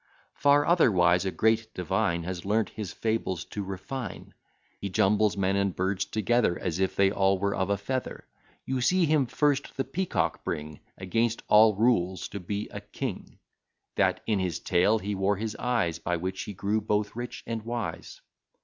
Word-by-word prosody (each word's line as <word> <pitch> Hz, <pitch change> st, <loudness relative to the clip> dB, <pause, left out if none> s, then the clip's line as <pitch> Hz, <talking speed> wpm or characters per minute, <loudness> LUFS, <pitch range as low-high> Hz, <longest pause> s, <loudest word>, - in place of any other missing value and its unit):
Far 145 Hz, +1 st, +4 dB
otherwise 90 Hz, -, +4 dB
a 95 Hz, -, 0 dB
great 110 Hz, +1 st, +1 dB
divine 85 Hz, -1 st, 0 dB
Has 90 Hz, 0 st, -5 dB
learnt 105 Hz, +2 st, +1 dB
his 105 Hz, -4 st, -6 dB
fables 110 Hz, -6 st, -2 dB
to 105 Hz, -, -5 dB
refine; 100 Hz, +7 st, -6 dB, 0.5 s
He 100 Hz, -, -4 dB
jumbles 105 Hz, +2 st, +2 dB
men 95 Hz, 0 st, +1 dB
and 100 Hz, -2 st, 0 dB
birds 95 Hz, +1 st, 0 dB
together, 110 Hz, -3 st, +1 dB
As 90 Hz, -1 st, -3 dB
if 95 Hz, -1 st, 0 dB
they 100 Hz, 0 st, +4 dB
all 95 Hz, -1 st, +2 dB
were 100 Hz, +1 st, 0 dB
of 95 Hz, 0 st, -1 dB
a 100 Hz, -, +2 dB
feather: 130 Hz, +6 st, -4 dB, 0.4 s
You 130 Hz, -1 st, -1 dB
see 180 Hz, +8 st, +3 dB
him 150 Hz, -4 st, +2 dB
first 145 Hz, +1 st, 0 dB
the 135 Hz, -, +1 dB
Peacock 170 Hz, +8 st, -1 dB
bring, 75 Hz, 0 st, -4 dB, 0.2 s
Against 115 Hz, +5 st, -1 dB
all 110 Hz, 0 st, +6 dB
rules, 95 Hz, -5 st, +1 dB
to 100 Hz, -, -6 dB
be 100 Hz, +3 st, -4 dB
a -, -, -7 dB
king; -, -, -6 dB, 0.6 s
That -, -, +1 dB
in 105 Hz, -3 st, +1 dB
his 90 Hz, -3 st, -1 dB
tail 95 Hz, +6 st, +3 dB
he 105 Hz, -1 st, -3 dB
wore 95 Hz, +1 st, +1 dB
his 110 Hz, +1 st, -4 dB
eyes, 110 Hz, -10 st, 0 dB
By 85 Hz, +1 st, -1 dB
which 95 Hz, +2 st, -4 dB
he 105 Hz, -, -6 dB
grew 105 Hz, +4 st, 0 dB
both 105 Hz, 0 st, -1 dB
rich 120 Hz, +1 st, -6 dB
and 115 Hz, -1 st, -3 dB
wise. 115 Hz, 0 st, -5 dB
105 Hz, 175 wpm, -28 LUFS, 95-115 Hz, 0.6 s, all